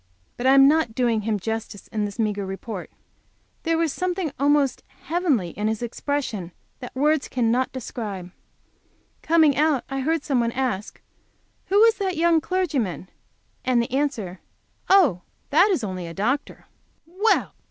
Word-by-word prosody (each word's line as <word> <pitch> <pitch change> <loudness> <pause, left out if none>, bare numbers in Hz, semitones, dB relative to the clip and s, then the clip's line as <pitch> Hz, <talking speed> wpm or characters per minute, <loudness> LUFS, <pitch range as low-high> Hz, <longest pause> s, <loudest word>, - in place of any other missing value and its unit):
But 245 - -1
I 265 - +6
am 275 0 +8
not 300 -6 +2
doing 235 -3 +1
him 210 -1 -1
justice 220 0 -5
in 215 -1 -1
this 205 0 -6
meagre 210 -3 -1
report; 195 0 -6 0.7
there 330 -1 0
was 325 -3 0
something 365 -3 -2
almost 285 -2 +2 0.2
heavenly 295 - 0
in 210 +1 -2
his 220 +1 -2
expression 240 - -3 0.3
which 250 - -7
words 300 +1 +2
cannot 245 +1 +1
describe. 210 -8 -6 0.9
Coming 315 -3 +4
out 300 -3 +2
I 270 - -2
heard 310 +3 0
some 270 -4 +1
one 235 0 0
ask, 245 -7 -3 0.7
"Who 400 +2 +3
was 455 0 +5
that 380 -4 -2
young 330 -1 +3
clergyman?" 285 - -2 0.5
and 255 -2 +2
the 235 - -1
answer, 245 -10 -2 0.5
"Oh, 330 - +5 0.3
that 350 +8 +5
is 355 - 0
only 185 -4 -4
a 165 - -8
doctor!" 250 +8 -2 0.4
Well! 385 +7 +1
260 Hz, 155 wpm, -24 LUFS, 215-315 Hz, 0.9 s, am